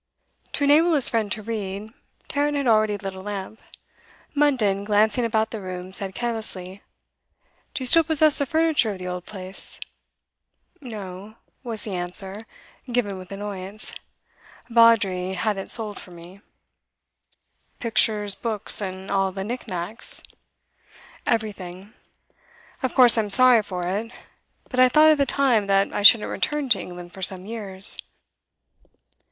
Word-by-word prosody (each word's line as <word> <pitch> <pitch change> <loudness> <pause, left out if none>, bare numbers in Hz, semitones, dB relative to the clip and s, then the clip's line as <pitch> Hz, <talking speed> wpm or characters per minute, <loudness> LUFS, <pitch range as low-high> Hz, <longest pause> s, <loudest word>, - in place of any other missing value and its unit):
To - - -1
enable 310 +4 +4
his 275 - +4
friend 220 -4 -1
to 215 -1 -3
read, 210 -1 -5 0.4
Tarrant 290 0 -1
had 280 - -2
already 215 -3 +2
lit 195 -1 -6
a 190 - -10
lamp. 205 +1 -7 0.7
Munden, 250 -10 +1
glancing 215 +3 +2
about 220 -1 0
the 220 - -6
room, 185 0 -7
said 195 -2 0
carelessly: 210 -5 -5 0.9
'Do 270 - -2
you - - -3
still 330 +6 +7
possess 310 -1 +2
the 280 - -1
furniture 315 -8 +2
of - - -9
the 185 - -8
old 180 0 -6
place?' 190 -1 -4 1.0
'No,' 205 -4 -9 0.3
was 230 -4 -5
the 205 - -6
answer, 190 +4 -1 0.4
given 205 -6 -1
with 185 0 -12
annoyance. 200 0 -3 0.8
'Vawdrey 205 -6 +3
had 205 +1 -1
it 195 - -7
sold 215 -3 0
for - - -13
me.' 175 +3 -13 1.4
'Pictures, 215 -3 +2
books, 215 0 -1
and 190 0 -6
all 195 -1 +1
the 190 0 -5
nick 240 +4 -6
nacks?' 185 +3 -4 1.0
'Everything. 200 -3 -3 0.9
Of 260 -3 -3
course 240 -3 +7
I'm 210 -2 -1
sorry 250 +1 +7
for 180 -4 -5
it; 205 +6 -3 0.6
but 255 - -4
I 255 0 +6
thought 310 +4 +6
at 305 - +1
the 280 - +2
time 245 -7 +2
that 195 0 +1
I - - -2
shouldn't 210 +2 +7
return 295 -3 -1
to 225 - +4
England 175 -1 -9
for 190 - -12
some 185 0 +1
years. 200 -3 -1
210 Hz, 145 wpm, -23 LUFS, 190-235 Hz, 1.4 s, still